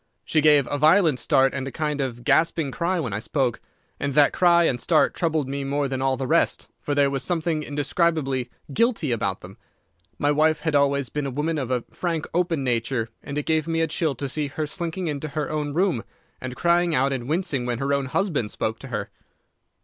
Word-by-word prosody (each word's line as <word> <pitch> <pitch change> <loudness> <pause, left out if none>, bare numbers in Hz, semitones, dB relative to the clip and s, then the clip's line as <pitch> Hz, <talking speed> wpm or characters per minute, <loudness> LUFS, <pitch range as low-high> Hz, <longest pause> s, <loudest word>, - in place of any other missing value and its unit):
"She 155 - +2
gave 150 -2 +5
a 145 - -1
violent 155 -2 +4
start 135 +2 +3
and 135 -1 -3
a - - -5
kind 150 -1 -2
of 120 -3 -4
gasping 160 +1 +2
cry 175 +4 -1
when 125 -10 -3
I 100 - -1
spoke, 125 0 -1 0.4
and 140 -2 -2
that 145 -1 +5
cry 170 -1 +4
and 125 -7 +1
start 160 -3 +3
troubled 160 -5 0
me 140 +1 -3
more 140 +1 -1
than 130 -1 -3
all 135 -1 +1
the 135 - -3
rest, - - +1
for 145 - -2
there 140 -1 +3
was 135 -1 -2
something 165 0 -1
indescribably 145 -3 0 0.2
guilty 230 - +1
about 100 -5 -1
them. 95 +2 -12 0.6
My 145 - +2
wife 155 +1 +2
had 160 0 -1
always 140 -2 +2
been 145 +1 -3
a - - -2
woman 150 +4 -1
of 130 -3 -3
a 125 -2 0
frank, 165 -4 -2
open 170 -4 0
nature, 120 -1 -1
and 145 0 -6
it 150 - -2
gave 160 -1 +1
me 165 0 0
a - - +3
chill 155 -2 -1
to 140 +3 -4
see 145 +2 -2
her 155 +2 -3
slinking 170 +4 -4
into 150 -1 -3
her 150 0 -3
own 150 -1 -2
room, 170 - +1 0.4
and 130 -1 -5
crying 170 0 +2
out 135 +1 +2
and 125 -1 -4
wincing 155 -7 -1
when 120 -1 -1
her 140 +3 -1
own 140 -1 0
husband 150 - -1
spoke 110 +1 -3
to 135 - -9
her. 105 -5 -4
145 Hz, 220 wpm, -24 LUFS, 130-160 Hz, 0.6 s, gave